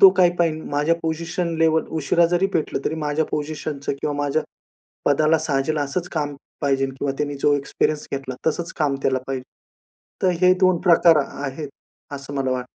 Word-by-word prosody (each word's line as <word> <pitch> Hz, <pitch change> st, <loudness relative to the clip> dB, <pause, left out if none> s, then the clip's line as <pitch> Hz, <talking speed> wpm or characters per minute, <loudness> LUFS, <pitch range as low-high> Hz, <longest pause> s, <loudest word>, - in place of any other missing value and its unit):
तो 195 Hz, -, +11 dB
काय 180 Hz, -2 st, +6 dB
पाहिल, 160 Hz, -2 st, +1 dB
माझ्या 150 Hz, +3 st, +2 dB
पोझिशन 165 Hz, +1 st, -2 dB
लेव्हल 160 Hz, 0 st, +3 dB
उशिरा 170 Hz, +4 st, +3 dB
जरी 175 Hz, +2 st, +3 dB
भेटलं, 160 Hz, -, 0 dB
तरी 160 Hz, -, 0 dB
माझ्या 155 Hz, 0 st, 0 dB
पोझिशनचं 150 Hz, -1 st, -3 dB
किंवा 145 Hz, -, -1 dB
माझ्या 145 Hz, +2 st, 0 dB, 0.6 s
पदाला 155 Hz, +3 st, +3 dB
साजेल 150 Hz, 0 st, 0 dB
असंच 145 Hz, +5 st, -2 dB
काम 145 Hz, -3 st, -2 dB, 0.3 s
पाहिजे 135 Hz, -1 st, +1 dB
किंवा 135 Hz, +1 st, -3 dB
त्यांनी 145 Hz, -1 st, -1 dB
जो 145 Hz, -, +4 dB
एक्सपिरियन्स 150 Hz, +2 st, -1 dB
घेतला, 135 Hz, -2 st, -4 dB
तसंच 165 Hz, +2 st, -1 dB
काम 145 Hz, -3 st, +2 dB
त्याला 130 Hz, -1 st, +2 dB
पाहिजे. 135 Hz, -1 st, -3 dB, 0.8 s
तर 185 Hz, -, +4 dB
हे 185 Hz, 0 st, +6 dB
दोन 185 Hz, -2 st, +4 dB
प्रकार 170 Hz, -1 st, +7 dB
आ -, -, -7 dB, 0.2 s
आहेत, 140 Hz, +2 st, -5 dB, 0.5 s
असं 140 Hz, 0 st, -7 dB
मला 135 Hz, -2 st, 0 dB
वाटतं. 125 Hz, -1 st, -2 dB
150 Hz, 175 wpm, -22 LUFS, 140-165 Hz, 0.8 s, तो